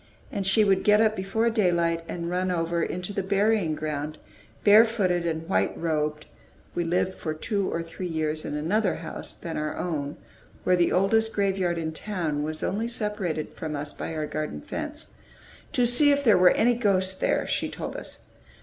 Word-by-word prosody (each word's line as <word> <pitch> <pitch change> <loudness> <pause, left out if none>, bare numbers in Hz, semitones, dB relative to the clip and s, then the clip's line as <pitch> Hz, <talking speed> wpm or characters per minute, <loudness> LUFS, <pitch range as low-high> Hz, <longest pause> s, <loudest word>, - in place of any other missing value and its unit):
And 200 -3 -2
she 215 +3 +5
would 195 -1 +3
get 210 0 +5
up 220 -1 +3
before 195 +4 0
daylight 170 -6 +1
and 170 -1 -4
run 180 +1 -1
over 170 -1 0
into 180 +4 -3
the 195 - -1
burying 200 -3 +1
ground, 150 0 -4 0.5
barefooted 205 -5 +4
and 160 0 -3
white 190 - +1
robed 150 -2 -1 0.5
(we 175 - -1
lived 180 +2 0
for 155 -4 -4
two 200 +4 -1
or 165 - -2
three 165 +2 -6
years 155 -2 -2
in - - -4
another 185 +6 +1
house 160 -1 -7
than 165 - -6
our 150 0 -3
own, 150 -4 -3 0.5
where 185 - +4
the 175 -1 +2
oldest 220 +4 +2
graveyard 190 -4 0
in 160 -1 -2
town 160 -4 -2
was 155 +1 -3
only 220 +4 -1
separated 210 -9 -2
from 155 -2 -5
us 145 0 -4
by 160 - -5
our 155 -1 -2
garden 150 - -4
fence), - - -6 0.6
"to 245 - +3
see 265 +5 +6
if 285 0 +2
there 225 -6 +6
were 180 0 +7
any 240 +2 +3
ghosts 195 -5 +2
there," 190 - 0
she - - -1
told - - -6
us. - - -4
180 Hz, 185 wpm, -26 LUFS, 160-205 Hz, 0.6 s, were